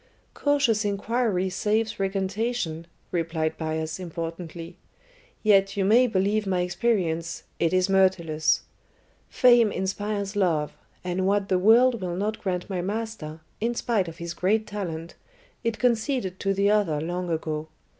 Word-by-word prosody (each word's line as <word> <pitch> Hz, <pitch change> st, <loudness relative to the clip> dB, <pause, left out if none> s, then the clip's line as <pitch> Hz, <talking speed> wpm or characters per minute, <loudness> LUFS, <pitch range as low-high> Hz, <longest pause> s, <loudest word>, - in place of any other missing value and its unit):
"Cautious 280 Hz, -7 st, +2 dB
inquiry 205 Hz, -1 st, 0 dB
saves 215 Hz, +3 st, 0 dB
recantation," 195 Hz, -3 st, -2 dB, 0.2 s
replied 165 Hz, -2 st, -1 dB
Bias 160 Hz, +1 st, -3 dB
importantly. 170 Hz, 0 st, -6 dB, 0.7 s
"Yet 200 Hz, -1 st, +4 dB
you 195 Hz, -, +2 dB
may 240 Hz, +5 st, +5 dB
believe 205 Hz, 0 st, +1 dB
my 185 Hz, -2 st, +1 dB
experience, 180 Hz, -4 st, -1 dB, 0.2 s
it 165 Hz, -, +2 dB
is 185 Hz, 0 st, +3 dB
Myrtilus. 170 Hz, -6 st, +2 dB, 0.7 s
Fame 240 Hz, -4 st, +5 dB
inspires 200 Hz, +2 st, -2 dB
love, 165 Hz, -7 st, +1 dB, 0.3 s
and 180 Hz, +1 st, -1 dB
what 200 Hz, 0 st, +1 dB
the 185 Hz, -, +3 dB
world 230 Hz, +3 st, +5 dB
will 175 Hz, -2 st, -3 dB
not 210 Hz, +4 st, -2 dB
grant 180 Hz, -3 st, -2 dB
my 185 Hz, -3 st, -2 dB
master, 195 Hz, -6 st, -4 dB, 0.2 s
in 235 Hz, +2 st, -1 dB
spite 225 Hz, -7 st, 0 dB
of 165 Hz, -, -8 dB
his 170 Hz, 0 st, -5 dB
great 210 Hz, +5 st, +1 dB
talent, 170 Hz, -6 st, -5 dB, 0.5 s
it 230 Hz, -1 st, -1 dB
conceded 235 Hz, -5 st, 0 dB
to 195 Hz, -, 0 dB
the 200 Hz, +1 st, +2 dB
other 195 Hz, -8 st, +2 dB
long 175 Hz, +3 st, -3 dB
ago. 155 Hz, -1 st, -2 dB
190 Hz, 135 wpm, -26 LUFS, 170-215 Hz, 0.7 s, may